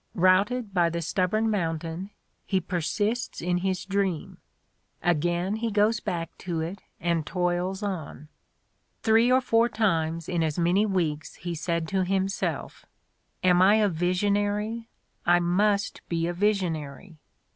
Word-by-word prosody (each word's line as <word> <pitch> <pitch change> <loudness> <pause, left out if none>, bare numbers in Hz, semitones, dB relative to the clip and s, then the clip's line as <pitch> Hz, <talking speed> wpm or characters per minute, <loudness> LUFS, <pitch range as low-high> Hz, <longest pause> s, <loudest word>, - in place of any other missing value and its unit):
Routed 200 +5 +3
by 175 -2 +3
the 170 +1 -3
stubborn 190 +6 0
mountain, 165 -1 -2 0.4
he 190 - +2
persists 205 +7 -2
in 180 +1 0
his 185 0 -2
dream: 195 -5 -2 0.6
again 175 +4 +1
he 230 +1 -1
goes 210 +1 +2
back 165 -4 -4
to 175 -3 -3
it 170 +5 -4 0.2
and 170 -1 0
toils 180 +5 -1
on. 160 -7 -5 0.8
"Three 225 +2 +4
or 260 +1 +5
four 230 -1 +3
times 165 -7 0
in 175 -2 0
as 155 -2 -1
many 180 +5 +3
weeks 160 -6 -1
he 175 -1 -5
said 170 0 -2
to 190 -1 +1
himself: 195 +1 -2 0.6
'Am 180 -1 +5
I 195 +3 +6
a 215 -2 +3
visionary? 205 +6 0 0.3
I 175 0 +4
must 200 +4 +1
be 165 -1 0
a 175 - -1
visionary!' 175 -4 -2
185 Hz, 135 wpm, -26 LUFS, 170-205 Hz, 0.8 s, I